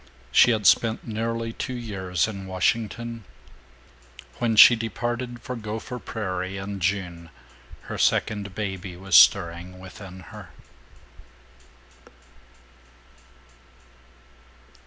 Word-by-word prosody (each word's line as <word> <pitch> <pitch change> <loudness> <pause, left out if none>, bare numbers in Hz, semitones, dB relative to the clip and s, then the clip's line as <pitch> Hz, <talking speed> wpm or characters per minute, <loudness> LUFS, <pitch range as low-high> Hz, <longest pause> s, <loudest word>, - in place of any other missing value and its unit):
She - - +6
had 110 -3 0
spent 110 +3 +3
nearly 115 +1 -3
two 130 - -5
years 95 -7 -2
in 100 -3 -7
Washington. 115 +4 -2 1.2
When 115 -2 +1
she 120 +3 +9
departed 120 +2 -4
for 125 - -5
Gopher 110 +3 -6
Prairie, 95 -4 -4
in 100 0 -5
June, 90 -2 -2 0.5
her - - -7
second 100 -2 0
baby 95 -3 -5
was 95 -1 -1
stirring 85 +4 +5
within 95 0 -11
her. - - -10
105 Hz, 95 wpm, -25 LUFS, 95-115 Hz, 1.2 s, she